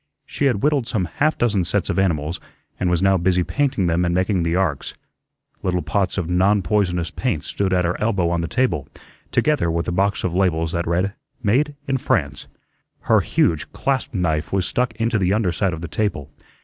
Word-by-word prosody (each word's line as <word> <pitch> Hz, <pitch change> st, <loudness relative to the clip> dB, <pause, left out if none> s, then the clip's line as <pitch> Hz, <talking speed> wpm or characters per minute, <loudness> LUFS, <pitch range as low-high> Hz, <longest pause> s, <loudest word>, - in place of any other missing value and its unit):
She 145 Hz, -, -2 dB
had 120 Hz, -7 st, +1 dB
whittled 145 Hz, -5 st, +2 dB
some 110 Hz, -8 st, -1 dB
half 155 Hz, -, 0 dB
dozen 105 Hz, -6 st, +1 dB
sets -, -, -1 dB
of -, -, 0 dB
animals, 85 Hz, -3 st, 0 dB, 0.4 s
and 90 Hz, -, +1 dB
was 90 Hz, +1 st, +1 dB
now 95 Hz, 0 st, +4 dB
busy 90 Hz, 0 st, +2 dB
painting 135 Hz, -4 st, 0 dB
them 85 Hz, +1 st, +1 dB
and 85 Hz, 0 st, 0 dB
making 95 Hz, 0 st, +1 dB
the 85 Hz, 0 st, 0 dB
arks. 90 Hz, -7 st, -1 dB, 0.7 s
Little 90 Hz, -1 st, -1 dB
pots 100 Hz, -3 st, -1 dB
of 90 Hz, -4 st, -1 dB
"non 95 Hz, +3 st, +2 dB
poisonous" 90 Hz, -5 st, 0 dB
paint 110 Hz, -, -2 dB
stood 100 Hz, -1 st, -2 dB
at 90 Hz, -1 st, +2 dB
her 90 Hz, -, -2 dB
elbow 100 Hz, -6 st, +1 dB
on 85 Hz, -1 st, 0 dB
the 85 Hz, -, -2 dB
table, 90 Hz, -, 0 dB, 0.4 s
together 150 Hz, -, +2 dB
with 85 Hz, +1 st, -1 dB
a -, -, 0 dB
box 100 Hz, +3 st, 0 dB
of 90 Hz, -, -1 dB
labels 85 Hz, -4 st, +1 dB
that 85 Hz, 0 st, -2 dB
read, 90 Hz, +4 st, 0 dB, 0.3 s
"Made 140 Hz, +8 st, +2 dB
in 135 Hz, -1 st, +1 dB
France." 70 Hz, -, -1 dB, 0.5 s
Her -, -, +4 dB
huge 80 Hz, -3 st, 0 dB
clasp 135 Hz, -1 st, -1 dB
knife 80 Hz, -6 st, -1 dB
was 95 Hz, -1 st, +1 dB
stuck 125 Hz, +1 st, -1 dB
into 115 Hz, -1 st, 0 dB
the 95 Hz, 0 st, +2 dB
under 105 Hz, -5 st, +1 dB
side 90 Hz, +2 st, 0 dB
of 80 Hz, -1 st, -6 dB
the 85 Hz, -, -4 dB
table. 80 Hz, -6 st, -2 dB
95 Hz, 200 wpm, -21 LUFS, 85-105 Hz, 0.7 s, now